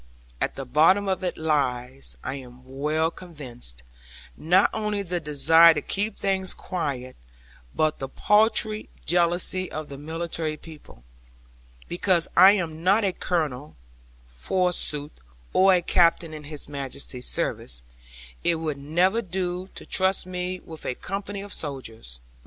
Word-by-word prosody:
At - - -1
the 135 - -5
bottom 165 +9 +4
of 190 0 -1
it 180 - -2
lies 135 -4 -1
(I - - -3
am 125 -2 -10
well 150 +5 0
convinced) 125 - -8 0.5
not 180 - +3
only 210 -2 -1
the 175 -1 -2
desire 160 +2 +6
to 150 - -1
keep 205 +1 -3
things 190 -2 0
quiet, 135 -8 -4 0.6
but 155 0 +1
the 135 - -4
paltry 215 +3 +2 0.2
jealousy 175 +2 +1
of 155 -1 -5
the 140 -1 -8
military 160 0 -3
people. 150 - -14 0.8
Because 175 -1 +1
I 190 +3 +9
am 165 -5 -3
not 200 +4 +4
a 190 - +1
Colonel, 150 -6 -2 0.5
forsooth, 150 - -1 0.4
or 190 +1 +6
a 175 - +1
Captain 170 -2 +3
in 150 -1 -8
His 150 -1 -7
Majesty's 140 -3 -4
service, - - -2 0.6
it 170 - +3
would 155 -3 -3
never 180 +10 +2
do 185 -1 -3
to - - -9
trust 190 0 +2
me 180 0 -4
with 160 -1 -11
a 125 - -2
company 195 +4 -5
of 205 - -6
soldiers! 115 - -3
165 Hz, 140 wpm, -25 LUFS, 140-185 Hz, 0.8 s, I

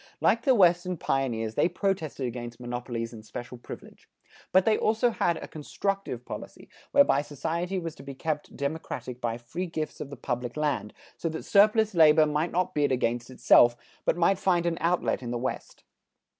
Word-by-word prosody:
Like 230 - +3
the 265 0 +4
Western 180 -2 +3
pioneers, 115 -7 -1
they 170 - +2
protested 175 -7 -2
against 120 -1 -6
monopolies 120 -1 -4
and 110 -1 -10
special 120 +3 -8
privilege. - - -11 0.4
But 185 +1 +5
they 220 - +4
also 225 +3 +2
had 170 -6 0
a - - -7
constructive 195 +6 -3
policy, - - -9 0.2
whereby 280 - +5
society 165 +6 -3
was 165 -3 -4
to - - -13
be 140 -1 -8
kept 150 +2 -4
democratic 140 -3 -4
by 115 -1 -1
free 165 +10 -5
gifts 155 -2 -4
of 140 - -5
the 140 - -8
public 120 +2 -4
land, 150 -8 -1 0.2
so 165 - -2
that 160 0 -6
surplus 215 +1 +4
labor 155 -2 +6
might 150 +3 -1
not 180 +1 0
bid 145 -2 +1
against 120 -1 0
itself, 120 -1 +5 0.3
but - - +1
might 180 +2 +3
find 175 -3 +2
an 170 -1 -1
outlet 170 -3 +1
in 120 - -5
the 120 - -2
West. 130 +2 -5
155 Hz, 180 wpm, -27 LUFS, 125-180 Hz, 0.4 s, labor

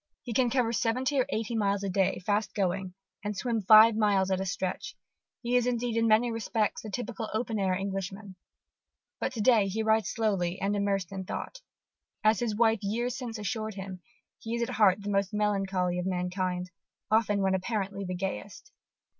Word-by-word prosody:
He 240 - -5
can 245 +1 +3
cover 235 -2 +1
seventy 255 +5 +1
or 255 - +2
eighty 225 -2 -2
miles 200 -2 +1
a 200 - -1
day, 190 0 +1
fast 210 0 0
going, 190 -1 -1 0.3
and 205 -1 -3
swim 230 0 -1
five 215 +3 +8
miles 200 -3 +2
at 190 0 +1
a 190 - -3
stretch: 185 - -3 0.5
he 240 +1 0
is 245 -1 +3
indeed, 240 -1 -1
in 230 0 +2
many 225 +2 +4
respects, 225 -1 -1
the 215 - -7
typical 230 0 -4
open 225 -1 -1
air 190 -2 +1
Englishman. 195 +1 -5 0.8
But - - -1
to 230 - -3
day 215 -3 +4
he 220 +3 -2
rides 220 0 +2
slowly 195 -6 -1
and 200 +1 0
immersed 195 -3 -1
in 190 -1 -5
thought. - - -6 0.6
As 215 -1 +4
his 230 -3 -1
wife 225 0 +3
years 235 +5 -1
since 245 -4 -5
assured 215 0 -3
him, 190 -2 -7 0.4
he 230 +1 -4
is 235 - 0
at 235 - -3
heart 200 -2 +4
the 205 - -3
most 195 +1 0
melancholy 195 -4 0
of 180 - -2
mankind, 180 0 -2 0.4
often 215 -2 +3
when 190 0 +2
apparently 195 0 -2
the 185 -1 -4
gayest. 180 - -5
210 Hz, 190 wpm, -29 LUFS, 190-225 Hz, 0.8 s, five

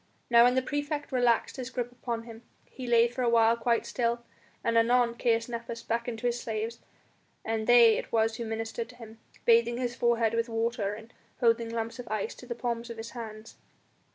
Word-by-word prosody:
Now 235 0 +8
when 250 +1 +4
the 260 - +2
praefect 290 +2 -3
relaxed 245 -2 +2
his 255 -1 -5
grip 245 -2 -3
upon 240 -2 -4
him, 230 -1 -11 0.2
he 255 -2 -9
lay 235 0 +5
for 245 +2 -5
a 245 - +2
while 230 0 +5
quite 235 0 0
still, 235 -1 -1 0.4
and 230 - +1
anon 235 +1 +4
Caius 230 -1 +1
Nepos 235 -1 -6
beckoned 235 0 -2
to 245 - -7
his 240 0 +1
slaves, 225 +1 -4 0.7
and 220 -1 -2
they 235 -2 +7
it - - -8
was 225 0 +1
who 235 - -4
ministered 225 +1 -4
to 250 - -13
him, 225 -2 -12 0.3
bathing 235 0 +4
his 245 -1 -2
forehead 235 -2 +2
with 230 +1 0
water 225 -2 -1
and 225 +2 -13 0.3
holding 230 -1 +2
lumps 230 +1 -4
of 245 - -7
ice 215 -2 -2
to 250 - -13
the 235 - -4
palms 235 0 -3
of 230 - -7
his 225 +1 -7
hands. 220 -2 -9
235 Hz, 205 wpm, -29 LUFS, 225-240 Hz, 0.7 s, Now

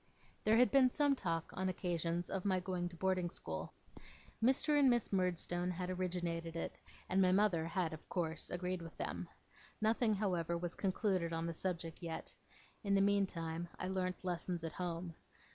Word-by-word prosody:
There 215 +1 +5
had 250 +1 +5
been 270 -2 +6
some 290 +2 +3
talk 165 -8 -2
on 190 0 0
occasions 175 -1 -1
of 190 -2 -1
my 190 -2 +2
going 180 -1 -2
to 175 - -11
boarding 185 0 +1
school. 80 - -5 0.7
Mr. 285 +4 +4
and 275 -2 +6
Miss 240 -4 +1
Murdstone 180 -1 +1
had 180 +1 -2
originated 175 -2 -2
it, 165 - -4 0.3
and 190 +1 +3
my 185 -1 +5
mother 185 -5 +3
had 165 -1 0
of 155 - -10
course 165 -3 -1
agreed 180 0 -2
with 165 -1 -9
them. - - -3 0.5
Nothing, 220 0 +3
however, 175 -4 0
was 175 0 -3
concluded 185 -3 0
on 165 0 -1
the 170 - -2
subject 170 -1 -3
yet. 165 -2 -5 0.5
In 200 -1 +2
the - - +5
meantime, 175 -4 +1
I 185 - -3
learnt 185 -1 -2
lessons 175 -1 -2
at 165 - -3
home. 175 -1 -3
180 Hz, 175 wpm, -37 LUFS, 170-195 Hz, 0.7 s, been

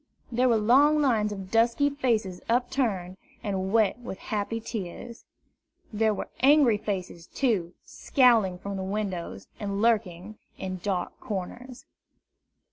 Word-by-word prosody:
There 250 +2 +2
were 230 - +4
long 275 +8 +4
lines 225 -7 +2
of 195 -2 -7
dusky 235 +5 +3
faces 225 -10 -1
upturned, 230 -7 0 0.3
and 190 -3 -2
wet 220 0 +2
with 240 -6 -7
happy 215 +3 -3
tears. 225 +1 -7 0.7
There 220 +1 +2
were 210 - -4
angry 270 -5 +5
faces, 185 -5 -5
too, 200 -10 -1
scowling 230 -9 +3
from 190 0 -5
windows, 190 - -4
and 200 -1 -3
lurking 210 -3 0 0.2
in 185 -1 -5
dark 185 -3 -3
corners. 240 +5 -6
215 Hz, 125 wpm, -27 LUFS, 190-240 Hz, 0.7 s, angry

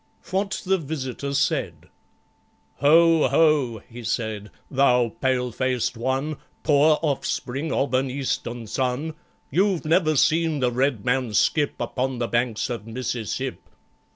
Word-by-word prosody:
What 195 +1 -1
the 190 0 +2
Visitor 140 -2 -4
said 140 - -1 0.9
"Ho, 165 +2 +5
ho!" 140 -6 +2
he 120 +1 -10
said, 110 -2 -3 0.2
"thou 125 -3 +3
pale 125 -2 +1
faced 130 0 -1
one, 135 +5 -2 0.3
Poor 150 +1 +4
offspring 140 0 -2
of 135 -1 0
an 130 +1 +2
Eastern 120 -3 -3
sun, 130 +7 -2 0.4
You've 185 +2 +1
never 155 -1 +3
seen 160 +1 +2
the 125 -2 +1
Red 125 -4 0
Man 125 -3 0
skip 145 +5 +2
Upon 130 0 -2
the 120 -1 -1
banks 120 -2 0
of 115 -2 -5
Mississip!" 115 -2 -3
130 Hz, 125 wpm, -24 LUFS, 120-155 Hz, 0.9 s, Ho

